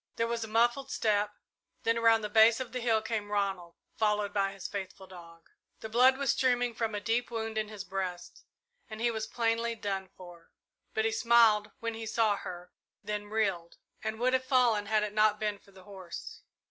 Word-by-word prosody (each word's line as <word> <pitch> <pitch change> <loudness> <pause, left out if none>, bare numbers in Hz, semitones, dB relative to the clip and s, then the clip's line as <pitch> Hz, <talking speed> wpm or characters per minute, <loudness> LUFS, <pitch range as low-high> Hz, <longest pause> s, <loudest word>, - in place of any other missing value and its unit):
There 230 - 0
was 230 0 -2
a - - -5
muffled 240 +5 +1
step, 210 -3 +1 0.5
then 230 - +2
around 230 -1 +4
the 210 - -3
base 225 +2 +6
of 255 -2 -5
the 255 - -3
hill 225 -2 +1
came 215 -2 -3
Ronald, 195 -4 -2 0.2
followed 210 -2 0
by 195 -1 +1
his 195 -2 -7
faithful 195 -1 -7
dog. 170 -3 -14 0.3
The 220 - -6
blood 255 +4 +5
was 280 -2 +1
streaming 245 -2 +1
from 225 -2 -2
a - - -1
deep 230 +3 -1
wound 225 -1 -4
in 215 -1 -1
his 210 -2 -7
breast, 185 -2 -5 0.5
and 215 0 -8
he 235 +1 +1
was 220 -1 -4
plainly 230 0 0
done 195 -3 -4
for; 175 -2 -13 0.5
but 220 - +1
he 225 - +2
smiled 225 -2 +4
when 230 0 -2
he 225 0 -6
saw 220 -2 +2
her, 180 -1 -8 0.3
then 210 0 -4
reeled, 195 -6 -1 0.3
and 220 0 -3
would 255 +1 +2
have 260 0 +2
fallen 245 -6 +2
had 215 0 +2
it 210 -1 -3
not 215 0 +3
been 210 -1 -2
for - - -23
the 190 -1 -16
horse. 190 -3 -9
215 Hz, 200 wpm, -30 LUFS, 200-230 Hz, 0.5 s, base